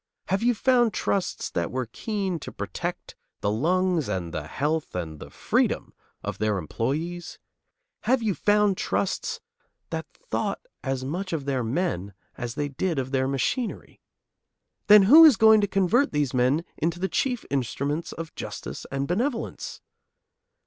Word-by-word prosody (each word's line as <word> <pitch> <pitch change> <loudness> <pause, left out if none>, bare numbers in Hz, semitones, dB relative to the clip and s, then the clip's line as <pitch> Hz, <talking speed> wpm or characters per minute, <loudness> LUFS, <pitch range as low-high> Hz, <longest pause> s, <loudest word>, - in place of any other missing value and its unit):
Have 195 +2 +1
you 240 +1 +3
found 240 -2 +3
trusts 190 -2 -1
that 85 -1 -1
were 130 0 -2
keen 190 - -3
to - - -7
protect - - -5 0.3
the 100 - +1
lungs 170 - +1
and 90 -4 -3
the 75 0 -4
health 150 - -2
and 80 -4 -4
the - - -9
freedom - - 0 0.3
of - - -4
their 105 -1 +1
employees? 155 - -3 0.7
Have 245 +1 +3
you 210 -3 +1
found 205 0 +3
trusts 195 - -1 0.5
that - - -3
thought - - -3 0.2
as 135 -1 -2
much 180 +6 -3
of 150 -4 -2
their 135 -3 0
men 115 - -2 0.2
as 120 -1 -5
they 145 -1 -1
did 165 +4 -1
of 130 -1 -2
their 130 -1 +1
machinery? 140 - -2 0.9
Then 210 -1 +9
who 295 +12 +9
is 300 -9 +8
going 220 0 +7
to 205 - +2
convert 195 +8 +2
these 145 -3 0
men 130 +6 +2
into 170 +2 0
the 190 - 0
chief 250 +3 -1
instruments 140 +4 -1
of 165 -1 -7
justice - - -6
and 135 0 -1
benevolence? 230 - -2
165 Hz, 155 wpm, -26 LUFS, 130-205 Hz, 0.9 s, Then